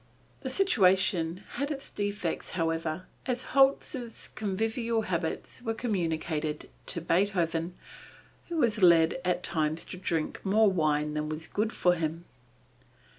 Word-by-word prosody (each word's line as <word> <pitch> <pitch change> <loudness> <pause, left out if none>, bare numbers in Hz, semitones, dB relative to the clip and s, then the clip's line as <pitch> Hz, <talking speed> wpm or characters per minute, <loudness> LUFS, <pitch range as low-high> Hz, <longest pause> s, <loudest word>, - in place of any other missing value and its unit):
The - - -4
situation 190 - +3
had 280 +3 -3
its 275 -2 -5
defects 205 -4 -3
however, 165 0 -1 0.2
as 250 -1 -1
Holz's 270 -3 +2
convivial 225 +3 -1
habits 170 +4 -3
were 225 -2 -2
communicated 160 -8 -2 0.2
to 170 - -1
Beethoven, 170 -1 +1 0.7
who 340 - -3
was 230 -7 +2
led 170 -1 +5
at 180 -1 0
times 155 0 0
to - - -7
drink 165 -3 -2
more 205 +1 +4
wine 150 -3 +1
than 150 0 -2
was 155 +1 -4
good 215 +2 -1
for 180 -5 +3
him. 165 0 -3
180 Hz, 125 wpm, -29 LUFS, 165-220 Hz, 0.7 s, led